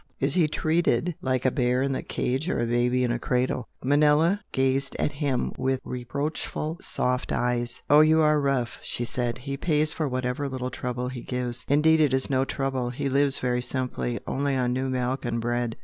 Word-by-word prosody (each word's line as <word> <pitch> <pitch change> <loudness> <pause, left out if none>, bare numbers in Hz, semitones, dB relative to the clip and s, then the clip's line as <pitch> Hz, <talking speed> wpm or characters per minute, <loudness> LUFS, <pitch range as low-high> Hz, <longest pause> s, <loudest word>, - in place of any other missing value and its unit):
Is 135 +1 +1
he 170 -4 +3
treated 160 0 +1
like 130 -1 -1
a 130 - +4
bear 125 -1 +1
in 135 0 0
a - - -2
cage 135 +7 -2
or - - 0
a - - +1
baby 120 +2 +1
in 120 - +1
a 120 - -1
cradle?" 125 -1 -1 0.2
Manella 150 +7 +3
gazed 135 +1 0
at - - 0
him 140 -3 -1
with 130 0 0
reproachful 145 +5 -4
soft 125 +1 -1
eyes. 120 0 -1
"Oh, 145 - +7
you 155 +1 +5
are 150 -1 +4
rough!" 135 -4 -1
she 120 - -3
said 120 0 -2
"He 140 +2 -5
pays 155 0 +1
for 155 - -1
whatever 130 +2 -2
little 130 -1 -4
trouble 125 0 -3
he 125 -2 -6
gives. 125 -1 -3
Indeed 155 +3 +4
it 140 -4 +3
is 130 +1 +1
no 130 0 +2
trouble! 135 -3 -2
He 125 +2 -3
lives 140 0 +3
very 125 -1 0
simply 125 -2 -3
only 140 0 -1
on 125 -1 +1
new 130 +1 -1
milk 130 +1 -1
and 120 -2 -1
bread. 120 0 -1
130 Hz, 195 wpm, -26 LUFS, 125-145 Hz, 0.2 s, Oh